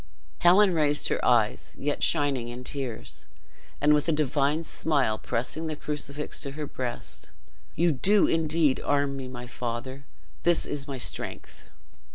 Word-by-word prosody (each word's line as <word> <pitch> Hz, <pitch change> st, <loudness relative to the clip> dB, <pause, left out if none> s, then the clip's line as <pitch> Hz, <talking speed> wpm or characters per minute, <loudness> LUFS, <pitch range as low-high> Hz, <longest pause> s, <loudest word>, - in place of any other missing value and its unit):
'" -, -, -31 dB
Helen 185 Hz, +2 st, +6 dB
raised 150 Hz, -2 st, +1 dB
her -, -, -1 dB
eyes, 115 Hz, -4 st, +2 dB
yet 145 Hz, +1 st, -2 dB
shining 135 Hz, -5 st, +2 dB
in 120 Hz, +1 st, -7 dB
tears, 125 Hz, -, -5 dB, 0.5 s
and 150 Hz, +1 st, +5 dB
with 150 Hz, +2 st, +2 dB
a -, -, +4 dB
divine 150 Hz, +1 st, +1 dB
smile 140 Hz, -9 st, 0 dB
pressing 155 Hz, +7 st, -2 dB
the 155 Hz, -, -3 dB
crucifix 150 Hz, 0 st, -4 dB
to 140 Hz, -2 st, -4 dB
her 150 Hz, +1 st, -4 dB
breast, 125 Hz, -4 st, -6 dB, 0.5 s
"You 170 Hz, +2 st, +3 dB
do 195 Hz, +9 st, +4 dB
indeed 160 Hz, -3 st, +2 dB
arm 140 Hz, -1 st, +1 dB
me, 135 Hz, -1 st, -5 dB
my 125 Hz, -1 st, -7 dB
father! 125 Hz, +3 st, -5 dB, 0.3 s
This 170 Hz, -1 st, +3 dB
is 140 Hz, 0 st, -4 dB
my 135 Hz, -2 st, -4 dB
strength!" 125 Hz, -, -4 dB
145 Hz, 155 wpm, -27 LUFS, 130-155 Hz, 0.5 s, Helen